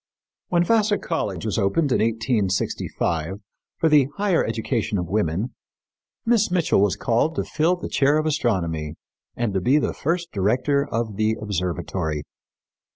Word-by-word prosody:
When 175 -1 +2
Vassar 215 +1 +3
College 100 - -3
was 110 0 -1
opened 135 +9 +1
in - - +3
1865 100 -6 -1 0.4
for 165 - +2
the 150 -4 +5
higher 200 -4 +2
education 115 -1 -1
of 90 - -1
women, 100 +4 -1 0.7
Miss 230 -2 +3
Mitchell 175 - +2
was 100 -2 +2
called 120 +8 +1
to - - 0
fill 165 +3 +1
the 180 - -6
chair 145 +2 +3
of 155 - 0
astronomy 85 - -1 0.4
and 115 -4 -1
to 95 - 0
be 130 +10 +4
the 150 - 0
first 170 +3 -2
director 130 +8 +1
of 115 -3 -2
the 110 0 +2
observatory. 90 -5 -2
115 Hz, 150 wpm, -23 LUFS, 95-155 Hz, 0.7 s, the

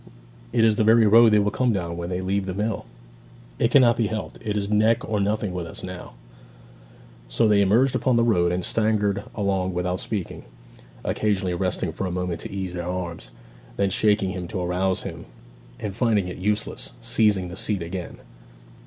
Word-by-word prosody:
'It 115 - +2
is 110 -2 +4
the - - +3
very 110 +1 +5
road 115 +2 +7
they 105 - +4
will 105 0 +2
come 125 -2 +1
down 85 -5 -2
when 85 0 -5
they 90 0 -2
leave 95 +1 -1
the 95 - -3
mill.' 105 +3 -2 0.7
'It 115 - +3
cannot 120 -3 +5
be 115 -3 0
helped; 110 +1 -5
it 105 -1 -2
is 100 -1 -1
neck 110 +2 +2
or 110 -2 -1
nothing 105 -1 -1
with 90 -2 -4
us 80 - -7
now.' 90 -1 -8 1.2
So - - +2
they 105 -1 +4
emerged 115 +7 +3
upon 130 -2 +1
the 115 - +3
road, 90 -7 +2
and 90 0 -1
staggered 105 -3 +1
along 95 -4 -1
without 90 +1 -1
speaking, 100 -6 -4 0.6
occasionally 95 -4 0
resting 90 -1 -1
for 95 +4 -4
a - - -4
moment 90 -2 -3
to - - -5
ease 95 -2 -4
their 85 -1 -4
arms; 85 -8 -5 0.5
then 100 -1 +1
shaking 105 -2 +2
him 90 -2 -5
to 90 - -4
arouse 90 +1 0
him, - - -7 0.5
and 100 -3 -5
finding 110 -6 +1
it 90 - -6
useless, 105 +3 -2
seizing 100 -5 +1
the 90 - -8
seat 100 -2 -1
again. 90 +1 -6
100 Hz, 190 wpm, -24 LUFS, 90-110 Hz, 1.2 s, road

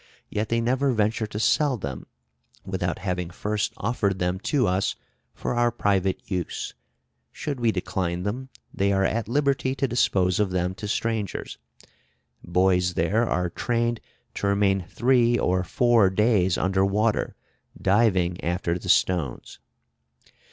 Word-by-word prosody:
Yet 105 +1 -2
they 115 0 +1
never 130 +3 +1
venture 110 0 0
to 105 - -7
sell 140 +3 +2
them 70 - -6 0.6
without 90 -2 -2
having 90 -2 -3
first 105 +3 -2
offered 100 -3 0
them 90 0 -1
to 140 -5 +2
us 95 0 0 0.4
for - - -3
our 120 0 +3
private 100 -5 0
use: 90 -4 -4 0.6
should 140 -4 -4
we 115 -2 +2
decline 90 -2 -2
them, 125 +6 -4 0.2
they 100 +1 +1
are 95 0 +2
at 110 +2 0
liberty 135 +1 +1
to 135 - 0
dispose 95 -6 +2
of 105 -2 +2
them 90 0 -1
to 105 +2 -7
strangers. 110 -1 -2 0.8
Boys 90 0 +2
there 105 +8 +1
are 90 0 0
trained 120 +1 -1 0.3
to 100 - -2
remain 100 -2 +2
three 120 -1 +3
or 90 -3 +1
four 115 +1 +3
days 95 -3 +2
under 95 +1 +1
water, 105 +3 +1 0.4
diving 95 -4 +2
after 85 0 -1
the - - -7
stones. 85 -9 +1
100 Hz, 140 wpm, -25 LUFS, 90-115 Hz, 0.8 s, our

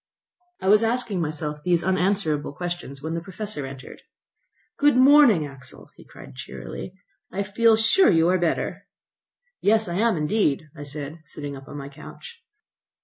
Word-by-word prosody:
I 190 - -4
was 210 +3 +6
asking 225 -5 -1
myself 150 -1 -4
these 175 0 +1
unanswerable 185 -6 0
questions 175 -5 -6
when 160 +1 -3
the 165 - -3
Professor 190 -5 -6
entered. 135 -1 -11 0.8
"Good 290 -3 +4
morning, 260 - +6
Axel," 140 -2 -12
he - - -15
cried - - -13
cheerily. 180 - -8 0.4
"I 200 +2 -2
feel 220 +3 +3
sure 225 - +5
you 165 0 +4
are 185 0 +2
better." 170 -2 -2 0.7
"Yes, 220 0 +3
I 175 0 -3
am 225 -2 +2
indeed," 150 -3 0
said 145 0 -6
I, 165 - -15
sitting 145 -2 -7
up 135 +1 -12
on 145 - -8
my 140 -1 -7
couch. 465 - -12
175 Hz, 155 wpm, -24 LUFS, 150-215 Hz, 0.8 s, was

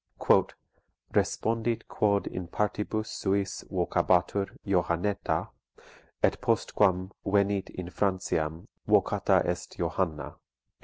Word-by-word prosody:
["Respondit 115 +1 0
quod 100 -1 +1
in 90 -1 -5
partibus 105 +3 -1
suis 100 -2 -1
vocabatur 95 +2 +1 0.2
Johanneta, 95 +1 0 0.7
et - - +2
postquam 95 -2 +2
venit 100 -1 +1
in 90 -1 -7
Franciam 85 -5 -1 0.2
vocata - - +3
est - - -4
Johanna." 80 -4 -2
95 Hz, 85 wpm, -28 LUFS, 90-105 Hz, 0.7 s, vocata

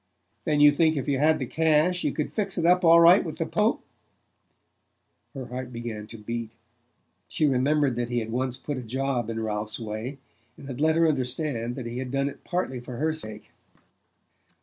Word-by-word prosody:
"Then 150 -1 +1
you 145 0 +8
think 155 +1 +2
if 140 - -3
you 140 -2 +1
had 155 +2 +4
the 130 - -3
cash 160 +5 +2
you - - +1
could 150 - -3
fix 200 -3 -1
it 170 - 0
up 180 +2 +4
all 165 0 +7
right 170 +4 +7
with 160 - -6
the 165 - -1
Pope?" 215 +6 0 1.5
Her 130 -2 -5
heart 125 +1 -6
began 115 -3 -6
to 115 - -10
beat. 115 +1 -5 0.8
She 155 - 0
remembered 140 0 +2
that 120 0 -2
he 120 - -1
had 115 -1 -2
once 130 +1 -2
put 145 +1 -5
a - - -5
job 125 0 -2
in 115 0 -3
Ralph's 105 -1 -3
way, 110 +5 -5 0.4
and - - -12
had 135 0 -6
let 160 0 +3
her 165 0 +4
understand 130 -3 -2
that 130 - -6
he 120 +1 -5
had 130 -1 -4
done 140 +1 0
it 140 - -13
partly 175 -8 -2
for 120 0 -8
her 155 +3 0
sake. 110 -9 -7
135 Hz, 200 wpm, -26 LUFS, 120-155 Hz, 1.5 s, you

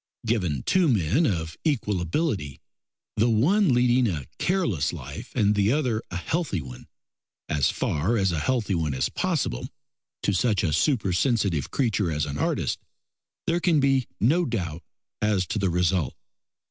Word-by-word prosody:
Given 90 - 0
two 185 -2 +3
men 115 - +2
of 80 -6 -2
equal 110 - 0
ability, 85 - -2 0.6
the 115 +3 +3
one 170 - +3
leading 125 0 +3
a 80 - -3
careless 140 - +1
life 70 -4 -8
and 105 0 +3
the 105 +1 +2
other 125 -6 0
a - - -7
healthy 145 - -1
one, 65 -4 -10 0.6
as 75 -3 +2
far 90 +11 0
as 95 -3 +2
a 80 - -1
healthy 110 +2 0
one 80 -5 -1
is 65 - 0
possible - - -1 0.5
to 100 - +1
such 105 0 +1
a 80 -5 +1
supersensitive 100 - +1
creature 110 -9 0
as 75 -1 0
an 75 0 -5
artist, - - 0 0.7
there 170 +1 +1
can 175 -3 +3
be 135 -2 +2
no 160 +11 +3
doubt 90 - -3 0.4
as 105 -3 +2
to 105 - -2
the 95 -2 +1
result. 90 -3 +1
100 Hz, 155 wpm, -25 LUFS, 80-130 Hz, 0.7 s, two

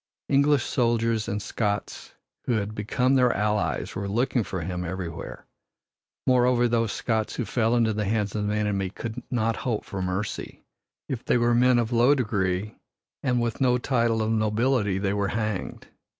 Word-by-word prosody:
English 140 0 +4
soldiers 115 -2 +1
and 105 0 -3
Scots 105 -2 -3 0.3
who 125 - +1
had 105 -1 -1
become 125 +5 0
their 125 -2 +4
allies 105 0 0
were 100 0 -3
looking 120 +3 +1
for 95 -1 -4
him 90 +1 -3
everywhere. 85 -1 -6 0.8
Moreover, 125 -1 +4
those 115 -2 +1
Scots 110 -2 -1
who 120 - -2
fell 115 0 +1
into 115 -2 +2
the 105 0 -1
hands 105 0 0
of 105 -1 -1
the 105 - 0
enemy 100 -3 0
could 115 +4 -6
not 115 -2 0
hope 115 -5 -2
for 95 - -5
mercy. 95 +3 -4 0.4
If 125 -3 -4
they - - +2
were 120 0 +3
men 125 +1 +4
of 120 -1 0
low 120 +4 +5
degree 100 -5 -1 0.4
and 125 -3 +1
with 120 +1 -2
no 125 -1 +4
title 115 -3 +1
of 110 - 0
nobility 110 -1 +1
they 100 0 0
were 100 -1 0
hanged. 110 -2 -3
110 Hz, 170 wpm, -26 LUFS, 105-120 Hz, 0.8 s, low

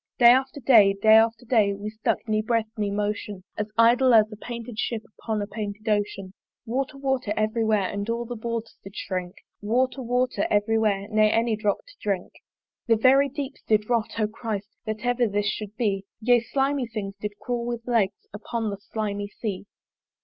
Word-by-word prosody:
Day 240 -1 +8
after 265 +3 +1
day, 220 -6 +6
day 220 +1 +6
after 225 +2 +4
day, 215 -4 +3
We 205 +2 -6
stuck, 220 +1 -2
ne 215 0 +1
breath 220 0 0
ne 210 -3 -1
motion, 205 -1 -3
As 210 0 -3
idle 240 +2 +5
as 215 0 +5
a - - -7
painted 235 0 -7
Ship 225 -2 -2 0.2
Upon 215 -2 -2
a - - -3
painted 210 0 -6
Ocean. 205 -3 -1 0.3
Water, 270 +4 -2
water, 265 -5 -1
every 215 +2 +1
where 215 -3 +2
And 205 +2 -4
all 235 +1 -1
the 240 +1 -5
boards 230 0 -4
did 195 +1 -11
shrink; 185 -1 -4 0.3
Water, 255 +5 0
water, 250 -3 0
every 215 +2 +2
where, 200 -2 +1
Ne 215 -1 +4
any 225 0 +2
drop 210 - -1
to - - -16
drink. 195 -3 -2 0.5
The 230 - +5
very 270 +5 +5
deeps 280 0 -6
did 215 +1 +2
rot: 230 -1 0
O 215 - +3
Christ! 215 -1 -5 0.2
That 215 +1 -4
ever 245 -1 +2
this 205 0 -1
should 210 +1 -4
be! 200 -5 0
Yea, 245 +2 +4
slimy 270 +2 0
things 210 -4 -5
did 205 -1 -5
crawl 240 -1 -3
with 235 -1 -4
legs 225 -5 0
Upon 220 +1 -3
the 200 - -5
slimy 205 -1 -4
Sea. 205 -1 -5
220 Hz, 190 wpm, -25 LUFS, 205-240 Hz, 0.5 s, Day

